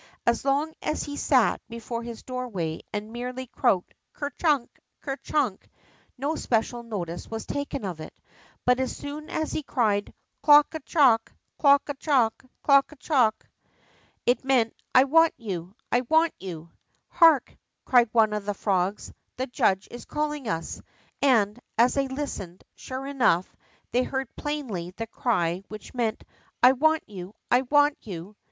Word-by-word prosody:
As 235 -1 +2
long 285 +3 +1
as 305 - -1
he 285 - -6
sat 260 -5 +2
before 230 0 -5
his 235 -1 -8
doorway 220 -11 -4
and 210 +2 -5
merely 250 +2 -5
croaked: 235 -6 0 0.2
Ker 285 -1 -4
chunk! 285 -4 0 0.2
Ker 270 -2 -4
chunk! 265 -12 -1 0.3
'' - - -36
no 280 +5 -1
special 240 -2 -1
notice 180 -7 -5
was 225 0 -5
taken 285 -4 -4
of 175 -4 -5
it. 155 - -10 0.5
But 250 +1 +4
as 260 - -2
soon 295 +2 -7
as 315 - -2
he - - -2
cried: 215 -8 0 0.3
Clook 295 0 +6
a 315 - -3
clook! 265 -7 +3 0.3
Clook 280 -1 +5
a 285 - -2
dook! 270 -6 +1 0.2
Clook 275 0 +5
a - - -12
clook! 250 -5 +1 0.4
'' - - -35
it 245 +2 +2
meant, 255 -4 +2 0.2
I 255 - +9
want 325 +4 +4
you! 185 -3 -6 0.2
I 245 - +3
want 320 +1 +4
you! 170 -3 -8 0.2
" - - -44
Hark! 325 -6 +6 0.2
'' - - -54
cried 240 -3 +5
one 220 -2 +4
of 210 -1 -3
the 205 0 -2
frogs, 195 0 -1
" - - -51
the 255 - -1
judge 195 -6 +1
is 240 - -9
calling 300 -3 -3
us,'' 165 -3 -3 0.4
and, 230 -5 +3 0.2
as 235 +2 +5
they 275 -1 +1
listened, 265 -10 -5
sure 260 +1 -7
enough, 250 -11 +1 0.4
they 245 - +3
heard 265 -1 -3
plainly 220 - -4
the 225 - -3
cry 185 -7 0
which 215 -1 -10
meant, 230 -3 -1 0.4
I 250 - +9
want 315 +4 +2
you! 190 -1 -9 0.2
I 245 - +5
want 290 +2 +3
you! 190 0 -8
245 Hz, 170 wpm, -26 LUFS, 210-280 Hz, 0.5 s, I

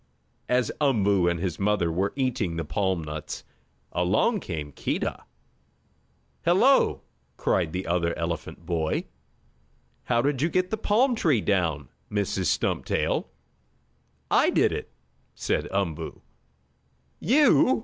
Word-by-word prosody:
As 125 -2 +2
Umboo 100 -10 +3
and 85 -1 -1
his 90 -2 -3
mother 100 -4 +1
were 95 +4 0
eating 120 -10 -1
the 80 -1 -3
palm 95 +1 -1
nuts, 75 0 -6 0.5
along 100 - +2
came 75 - -5
Keedah. - - -3 1.2
"Hello!" 215 +11 +4 0.3
cried 85 -4 +1
the 90 +3 -3
other 85 0 0
elephant 85 0 -4
boy. 80 -2 -1 1.0
"How 120 -1 +2
did 140 -2 0
you 160 - +2
get 185 +1 0
the - - +1
palm 225 +5 +2
tree 160 - +2
down, 85 -9 0 0.2
Mrs. 100 -2 -1
Stumptail?" 75 - 0 1.0
"I - - +5
did - - +3
it," - - -4 0.5
said - - -1
Umboo. 95 -6 -3 1.0
"You?" 265 -1 +4
95 Hz, 120 wpm, -26 LUFS, 85-140 Hz, 1.2 s, I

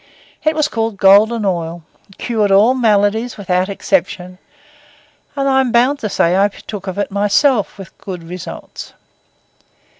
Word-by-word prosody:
It 310 0 +1
was 305 -1 +1
called 225 -5 -3
Golden 210 +4 +4
Oil, 170 -3 -3 0.3
cured 215 -4 -1
all 210 +6 +5
maladies 220 -1 +1
without 185 -1 -1
exception; 185 -2 -2 1.0
and 275 -1 -1
I 265 -1 +3
am 255 -2 -1
bound 255 +5 +2
to 215 - -3
say 170 -3 +1
that 190 +2 +2
I 200 - +4
partook 205 -1 -9
of 190 - -5
it 205 - -2
myself 205 +4 +1
with 195 -3 -12
good 180 -4 -7
results. 175 +1 -9
205 Hz, 150 wpm, -16 LUFS, 190-235 Hz, 1.0 s, all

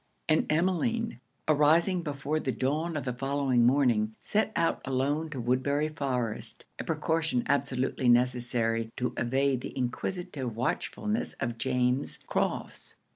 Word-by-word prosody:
And 155 -1 +2
Emmeline, 185 - +1 0.3
arising 160 +5 +4
before 145 0 -2
the 135 - -1
dawn 155 +6 -1
of 145 - -4
the 125 - -1
following 135 -2 +2
morning, 120 -5 +2
set 215 +1 0
out 165 0 +1
alone 140 +4 0
to 145 -4 -5
Woodbury 130 +5 +1
Forest 125 -7 -3
a - - -2
precaution 160 -6 0
absolutely 130 -2 +1
necessary, 120 -2 +2
to 125 - -1
evade 130 +1 +1
the - - -7
inquisitive 130 - -3
watchfulness 210 - -1
of 115 -1 -4
James 125 +1 +1
Crofts. - - -2
135 Hz, 130 wpm, -29 LUFS, 125-155 Hz, 0.3 s, arising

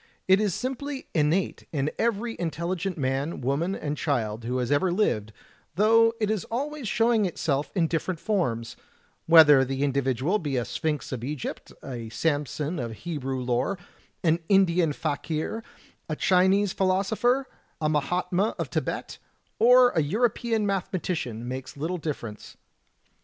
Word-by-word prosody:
It 190 +2 +5
is 205 -5 0
simply 265 +2 -4
innate 160 +4 0
in 145 -2 -1
every 230 0 0
intelligent 170 +2 -2
man, 135 +3 -1
woman, 145 +9 0
and 145 -1 -3
child 115 -7 -2
who 125 +2 -1
has 125 0 -1
ever 160 +6 +2
lived, 110 - 0 0.4
though 225 +3 +5
it 215 -1 +1
is 215 -5 -1
always 280 +2 -3
showing 225 -1 +2
itself 150 -4 -1
in 175 -4 +3
different 165 +1 -2
forms; 125 - -1 0.5
whether 155 -5 +8
the 135 +1 -2
individual 140 - +1
be 145 -7 -2
a 120 - 0
Sphinx 155 -2 -3
of 125 -3 -4
Egypt, 140 0 -5
a 120 -4 -6
Samson 150 +5 -1
of 115 -3 -4
Hebrew 135 +1 -4
lore, 125 +10 0 0.5
an 165 -1 +3
Indian 180 -5 +4
fakir, 155 +9 -3 0.5
a 155 - -1
Chinese 190 +3 +3
philoso 190 +2 +1
pher, 245 +4 +2 0.4
a 155 - 0
mahatma 180 +7 0
of - - -4
Tibet, - - -3 0.4
or 245 +2 +7
a 160 - +1
European 225 - 0
mathematician 180 - -2
makes 130 +2 -6
little 170 +5 -2
difference. 120 -9 -6
165 Hz, 140 wpm, -26 LUFS, 135-200 Hz, 0.5 s, whether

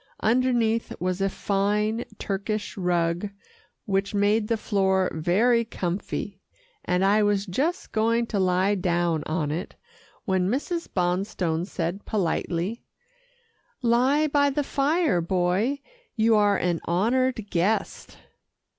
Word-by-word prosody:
Underneath 230 -1 +1
was 185 +1 -2
a 195 - +2
fine 210 +4 0
Turkish 205 +2 -3
rug 175 0 0 0.6
which 195 +1 -1
made 210 +2 +2
the 230 - +1
floor 190 -3 +1
very 210 +9 +2
comfy, 190 -1 -4 0.4
and 180 +1 +1
I 205 +2 +4
was 205 -1 +1
just 280 - -2
going 230 +2 +1
to 200 - +1
lie 185 +2 +2
down 175 -4 0
on 155 -2 -1
it, 165 +4 -5 0.5
when 190 -3 +1
Mrs. 330 - -2
Bonstone 180 -2 -1
said 180 +1 -3
politely, 185 +1 -2 1.0
"Lie 255 +6 +3
by 285 -1 +3
the 285 +1 -1
fire, 280 - +1
Boy, 185 +10 0 0.3
you 225 -1 +3
are 205 -1 +4
an 175 -2 -1
honoured 225 +4 0
guest." 195 +4 -1
200 Hz, 120 wpm, -25 LUFS, 180-230 Hz, 1.0 s, I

